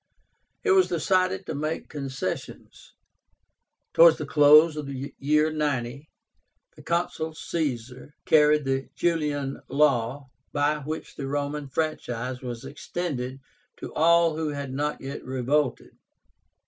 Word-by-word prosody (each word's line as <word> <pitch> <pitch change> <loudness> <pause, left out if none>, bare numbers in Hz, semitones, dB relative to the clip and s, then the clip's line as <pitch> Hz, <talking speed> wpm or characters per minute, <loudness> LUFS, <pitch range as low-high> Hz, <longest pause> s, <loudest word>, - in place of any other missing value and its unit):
It 415 - +2
was 380 -1 +5
decided 185 +3 +1
to - - -4
make 155 +3 -3
concessions. 135 -3 -6 1.0
Towards 165 -1 +7
the 150 - -4
close 150 +2 +6
of 150 -2 -5
the 140 +1 -6
year 150 +2 +2
90, 140 -2 -2 0.7
the - - -14
Consul 170 -2 -2
Caesar 130 -4 -4
carried 150 -1 +4
the 135 0 -1
JULIAN 150 -5 -1
LAW, 135 -2 +1 0.3
by 145 +1 +1
which 155 +2 -6
the 135 - -4
Roman 145 +1 -3
franchise 130 -4 -3
was 120 -3 -6
extended 135 -4 -4 0.4
to - - -8
all 170 0 +4
who 160 -1 -1
had 140 -2 -5
not 150 +2 -2
yet 135 +1 -6
revolted. 130 +1 -1
145 Hz, 120 wpm, -26 LUFS, 135-155 Hz, 1.0 s, Towards